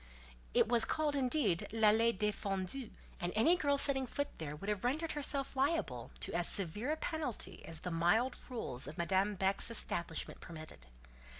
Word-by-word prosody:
It - - +5
was 235 0 +4
called 305 -2 0
indeed 260 - +1
"l'allée 225 +1 +4
défendue," 210 +2 -2 0.3
and 175 -2 -2
any 305 +11 +5
girl 285 -5 +1
setting 265 -2 +4
foot 285 +4 -2
there 150 -2 -5
would 195 +7 -9
have 210 -2 -1
rendered 310 +6 0
herself 280 -2 -2
liable 265 - 0
to - - -1
as 175 0 +2
severe 205 - 0
a 315 - -1
penalty 255 - -4
as 165 -1 -6
the 180 - -4
mild 195 +10 +2
rules 140 - -3
of 150 - -8
Madame 190 +4 +1
Beck's 195 +3 +1
establishment 170 -7 -1
permitted. 155 - -10
215 Hz, 165 wpm, -35 LUFS, 175-275 Hz, 0.3 s, It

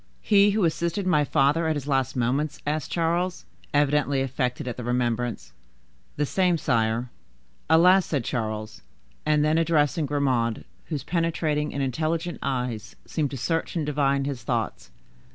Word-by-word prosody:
"He 205 -1 +5
who 205 -2 +2
assisted 170 +4 -1
my 150 -5 +3
father 145 +4 +2
at 160 - +1
his 145 -1 -5
last 135 -3 0
moments?" 135 +5 0
asked 150 -1 -2
Charles, 175 +2 -1 0.3
evidently 145 -1 +2
affected 125 -1 -2
at 120 - -3
the 125 - -6
remembrance. 120 -1 -1 0.6
"The 150 - 0
same, 180 +2 +2
sire." 115 -3 0 0.6
"Alas!" 180 +4 +6
said 140 -6 -1
Charles; 110 -2 -4 0.5
and 150 -1 +3
then 155 +2 +3
addressing 155 -2 +2
Grimaud, 130 -6 0 0.2
whose 150 -4 -4
penetrating 160 -3 0
and 140 - -2
intelligent 160 +6 -2
eyes 125 -6 -3
seemed 150 -3 -1
to 135 - -6
search 165 +8 -2
and 160 -3 -1
divine 140 -2 +1
his 140 -3 -4
thoughts. - - -3
145 Hz, 150 wpm, -25 LUFS, 125-165 Hz, 0.6 s, Alas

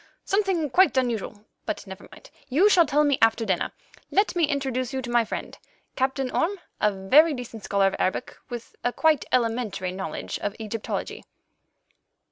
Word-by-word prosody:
Something 380 -8 0
quite 370 -4 +4
unusual. 220 -4 -1 0.2
But - - -3
never 190 0 -10
mind; - - -15 0.2
you 335 +11 +5
shall 345 -5 +5
tell 295 +1 +3
me 285 -2 +2
after 225 0 +3
dinner. - - 0 0.4
Let 400 -1 +2
me 340 -2 +4
introduce 265 -4 -2
you 265 - -2
to 240 - -5
my 240 -1 +4
friend, - - -5 0.4
Captain 265 -1 -1
Orme, 390 +5 0 0.2
a 210 - +3
very 275 +12 +4
decent 230 -4 -8
scholar 200 -1 +2
of 195 - +1
Arabic, 185 +7 -1
with 240 -2 -8
a 245 - +1
quite 315 +2 +2
elementary 225 -6 0
knowledge 185 -4 -5
of 205 - -3
Egyptology." 220 0 -4
250 Hz, 165 wpm, -25 LUFS, 215-300 Hz, 0.4 s, you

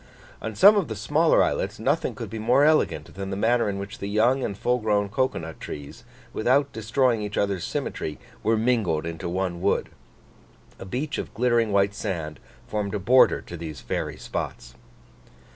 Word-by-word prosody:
On 110 -1 -5
some 205 - +7
of 190 -7 +1
the 110 - -4
smaller 150 +10 +3
islets, - - -1
nothing - - 0
could - - -7
be 110 - -5
more 125 +6 +3
elegant 150 - +2
than 95 0 -5
the 95 - -3
manner 115 +2 +2
in 100 - -3
which 100 +5 -7
the 100 - -4
young 120 +6 +2
and 100 - -3
full 125 +3 +1
grown 105 -2 +1
cocoa 130 +5 0
nut 80 -1 -7
trees, 70 -1 -8 0.3
without 135 +5 +2
destroying 115 +2 +1
each 105 -1 -4
other's 100 -3 0
symmetry, 75 - -3 0.2
were 110 0 +2
mingled 110 -9 +1
into 85 +1 -4
one 90 -1 -2
wood. 100 - +1 0.9
A - - -7
beach 130 +10 -3
of - - -6
glittering 120 -2 +2
white 100 0 +2
sand 85 -7 -4 0.3
formed 105 -1 -2
a - - -1
border 125 +7 +5
to 85 - -9
these 80 -4 -7
fairy - - -3
spots. - - -5
105 Hz, 180 wpm, -25 LUFS, 95-125 Hz, 0.9 s, some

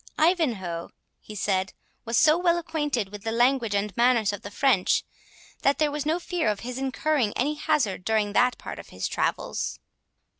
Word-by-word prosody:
"Ivanhoe," 235 - +1 0.3
he 215 - -11
said, 190 -1 0 0.3
"was 230 0 0
so 310 -1 +6
well 345 0 +2
acquainted 295 - -2
with 205 0 -9
the 225 - -3
language 240 -2 +2
and 200 -1 -1
manners 235 -4 +3
of 205 - -6
the 205 - -7
French, 205 -3 +2 0.6
that 275 +1 +3
there 305 -1 +2
was 295 0 -3
no 320 +2 +2
fear 350 -5 -2
of 210 -1 -2
his 250 +2 -5
incurring 270 -3 0
any 285 +5 +1
hazard 230 -11 0
during 215 -1 0
that 250 +3 +3
part - - -8
of - - -11
his - - -3
travels." - - -2
245 Hz, 180 wpm, -26 LUFS, 205-300 Hz, 0.6 s, so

